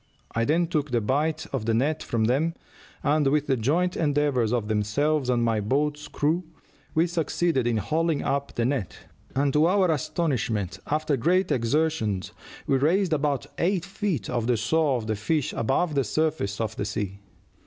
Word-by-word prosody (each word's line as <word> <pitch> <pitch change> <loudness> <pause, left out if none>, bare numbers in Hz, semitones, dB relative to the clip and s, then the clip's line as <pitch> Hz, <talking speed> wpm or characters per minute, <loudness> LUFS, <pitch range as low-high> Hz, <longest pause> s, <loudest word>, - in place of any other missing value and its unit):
I 115 0 +1
then 165 +5 +2
took 155 -4 -1
the 120 -2 +1
bight 145 +8 0
of 125 -5 -2
the 115 - +2
net 150 +6 +1
from 115 -2 -1
them, 145 +9 +1 0.5
and 150 0 +2
with 145 +1 +2
the 135 - +2
joint 160 +10 +1
endeavors 145 -7 +1
of 120 -4 0
themselves 125 +7 0
and 120 -1 +2
my 115 -2 +1
boat's 145 +7 -1
crew 155 +5 0 0.5
we 160 +2 +4
succeeded 165 -5 0
in 120 -2 +1
hauling 155 - 0
up 140 0 -2
the 115 - +1
net, 125 - -2 0.4
and 140 0 +1
to 150 +2 +4
our 185 -1 +3
astonishment, 115 - -1
after 155 0 +1
great 180 +8 +2
exertions, 115 - 0 0.3
we 135 - +2
raised 170 +5 +2
about 145 -3 0
eight 180 0 +1
feet 195 -3 -2
of 120 -2 -1
the 120 -2 +2
saw 140 +5 +2
of 115 - -5
the 110 0 -1
fish 140 +7 -1
above 140 +8 0
the 140 -1 +2
surface 150 -7 -1
of 110 -2 -2
the - - -2
sea. 100 -1 -4
140 Hz, 175 wpm, -26 LUFS, 115-160 Hz, 0.5 s, we